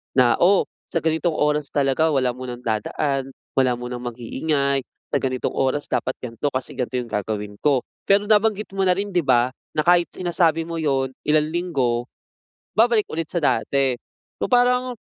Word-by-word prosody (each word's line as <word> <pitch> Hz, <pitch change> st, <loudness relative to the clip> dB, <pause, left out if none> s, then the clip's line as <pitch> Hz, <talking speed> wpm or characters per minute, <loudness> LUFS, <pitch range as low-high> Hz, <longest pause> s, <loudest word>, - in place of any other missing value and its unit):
na, 125 Hz, -2 st, +4 dB
"O, 190 Hz, +3 st, +5 dB, 0.2 s
sa 165 Hz, -3 st, -2 dB
ganitong 160 Hz, +1 st, +1 dB
oras 150 Hz, -1 st, +1 dB
talaga 140 Hz, +2 st, +1 dB
wala 135 Hz, -5 st, +2 dB
munang 125 Hz, 0 st, -7 dB
dadaan, 135 Hz, +5 st, -2 dB, 0.2 s
wala 130 Hz, -2 st, +2 dB
munang 125 Hz, 0 st, -6 dB
mag-iingay, 135 Hz, +4 st, -1 dB, 0.3 s
sa -, -, +3 dB
ganitong 130 Hz, -1 st, -1 dB
oras 135 Hz, +2 st, -1 dB
dapat 125 Hz, +1 st, 0 dB
ganito, 120 Hz, +3 st, -3 dB
kasi 130 Hz, -, -2 dB
ganito 125 Hz, 0 st, -3 dB
'yong 120 Hz, -2 st, -3 dB
gagawin 105 Hz, 0 st, -3 dB
ko." 140 Hz, -4 st, +2 dB, 0.2 s
Pero, 200 Hz, +1 st, +4 dB
nabanggit 210 Hz, -1 st, +2 dB
mo 195 Hz, -1 st, 0 dB
na 180 Hz, -, +4 dB
rin 200 Hz, +1 st, -3 dB
'di 180 Hz, -, +2 dB
ba, 125 Hz, -4 st, +3 dB, 0.2 s
na 155 Hz, -, +2 dB
kahit 175 Hz, 0 st, +4 dB
sinasabi 170 Hz, -2 st, +1 dB
mo 165 Hz, 0 st, -5 dB
'yon 135 Hz, -4 st, 0 dB, 0.2 s
ilang 155 Hz, 0 st, +3 dB
linggo, 130 Hz, -9 st, -1 dB, 0.7 s
babalik 225 Hz, -2 st, +4 dB
ulit 165 Hz, 0 st, -2 dB
sa 170 Hz, -, 0 dB
dati. 135 Hz, -3 st, +1 dB, 0.4 s
O, -, -, -1 dB
parang 250 Hz, 0 st, +3 dB
145 Hz, 165 wpm, -22 LUFS, 125-175 Hz, 0.7 s, O